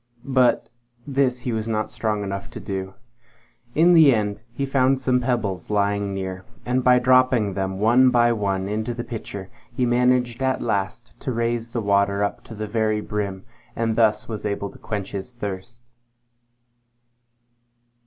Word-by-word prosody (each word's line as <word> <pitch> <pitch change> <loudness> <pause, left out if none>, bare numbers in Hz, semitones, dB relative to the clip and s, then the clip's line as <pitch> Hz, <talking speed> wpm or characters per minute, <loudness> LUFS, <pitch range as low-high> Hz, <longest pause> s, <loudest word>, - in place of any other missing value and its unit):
But 130 -1 +3 0.4
this 135 -3 0
he 125 - -3
was 110 -1 -2
not 110 -1 -1
strong 105 -2 -1
enough 100 +2 -5
to - - -8
do. 95 -1 -5 0.8
In 170 +3 +5
the 155 -6 +7
end 105 -1 -2
he 140 +3 -2
found 135 -1 +2
some 130 -1 +2
pebbles 115 -7 -2
lying 100 -1 0
near, 95 -1 -4 0.2
and 125 +1 0
by 125 0 +6
dropping 125 -4 +3
them 95 0 -2
one 120 +5 +5
by 120 -1 +4
one 100 -3 -1
into 110 +3 -2
the 120 - -4
pitcher, 100 -5 -7 0.2
he 125 +1 0
managed 125 0 +2
at 130 0 +1
last 115 +2 -3
to 130 - -3
raise 115 0 -1
the 115 -1 -3
water 100 0 +2
up 100 - -3
to 115 - -10
the 110 +1 -4
very 110 0 0
brim, 100 -3 -4 0.3
and 115 -1 0
thus 110 -2 +2
was 110 -2 -5
able 100 -1 -3
to - - -16
quench 100 -3 -4
his 100 +5 -6
thirst. 115 +1 -7
115 Hz, 165 wpm, -23 LUFS, 100-125 Hz, 0.8 s, the